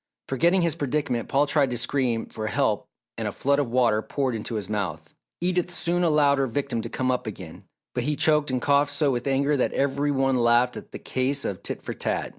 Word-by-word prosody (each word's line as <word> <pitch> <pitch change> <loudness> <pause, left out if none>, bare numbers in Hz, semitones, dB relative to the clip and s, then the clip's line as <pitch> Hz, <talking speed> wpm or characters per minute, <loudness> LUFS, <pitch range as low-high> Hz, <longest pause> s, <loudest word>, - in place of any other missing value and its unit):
Forgetting 170 +7 +2
his 170 -2 +2
predicament, 140 -4 -2
Paul 140 +1 +3
tried 145 -2 +2
to 120 - -1
scream 120 -1 0
for 110 0 -6
help - - 0 0.3
and - - -2
a - - -2
flood 140 +1 +1
of 140 -4 -1
water 115 -3 +2
poured 135 +1 -2
into 115 +1 -4
his 105 -3 -3
mouth. 90 -7 -4 0.3
Edith 180 0 0
soon 175 0 0
allowed 150 -4 +3
her 135 - +1
victim 130 -1 -2
to - - -6
come 130 0 0
up 125 -2 -2
again, 95 -6 -8 0.3
but 125 -1 -2
he 150 +1 0
choked 150 -1 +2
and 130 -1 0
coughed 145 +2 +2
so 145 0 +2
with 120 +1 -2
anger 140 +2 +2
that 130 - 0
every 140 +1 0
one 135 -1 +1
laughed 120 0 +3
at - - -9
the - - -6
case 135 +2 -1
of 95 - -3
"tit - - -4
for - - -4
tat." - - -2
135 Hz, 225 wpm, -25 LUFS, 120-145 Hz, 0.3 s, Paul